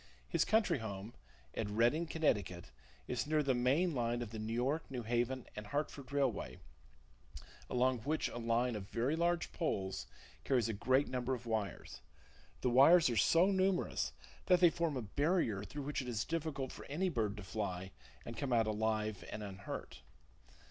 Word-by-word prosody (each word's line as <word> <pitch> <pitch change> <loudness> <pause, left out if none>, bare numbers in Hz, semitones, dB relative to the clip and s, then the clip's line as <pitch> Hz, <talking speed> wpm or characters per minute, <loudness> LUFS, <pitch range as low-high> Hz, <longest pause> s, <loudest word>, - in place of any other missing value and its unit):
His - - +2
country 220 0 +3
home, 105 0 -6 0.4
at 105 - -2
Redding, 120 +10 +2
Connecticut, 100 - 0 0.4
is 125 +1 -2
near 155 0 +2
the 135 -2 +2
main 135 +8 +2
line 120 -2 0
of 110 - -8
the 110 - -5
New 110 +1 -4
York, 130 +7 0
New 125 -3 -4
Haven 120 +2 0
and 105 0 -6
Hartford 140 0 -3
Railway, 130 - 0 1.1
along 125 0 +2
which 150 +7 -1
a 120 - -6
line 120 +1 +1
of 100 -1 -6
very 125 +6 0
large 170 +1 +1
poles 95 - -2 0.4
carries 125 -5 +2
a 115 - -1
great 130 +7 +2
number 125 0 -1
of 120 0 -10
wires. 110 -3 -3 0.6
The 125 - +1
wires 140 +4 +7
are - - -1
so 170 - +5
numerous 190 -1 +1 0.4
that 180 -2 +6
they 175 -2 +7
form 165 -5 -1
a 125 - -3
barrier 140 - +1
through 140 +9 -6
which 145 0 -2
it 130 - -7
is 110 -3 -1
difficult 155 -5 -2
for - - -10
any 165 +7 -1
bird 110 - -1
to 105 - -7
fly 95 -2 -4 0.3
and 115 - -6
come 140 0 -3
out 115 -2 +4
alive 110 -1 -1
and 105 - -5
unhurt. 100 0 -7
125 Hz, 175 wpm, -35 LUFS, 110-150 Hz, 1.1 s, wires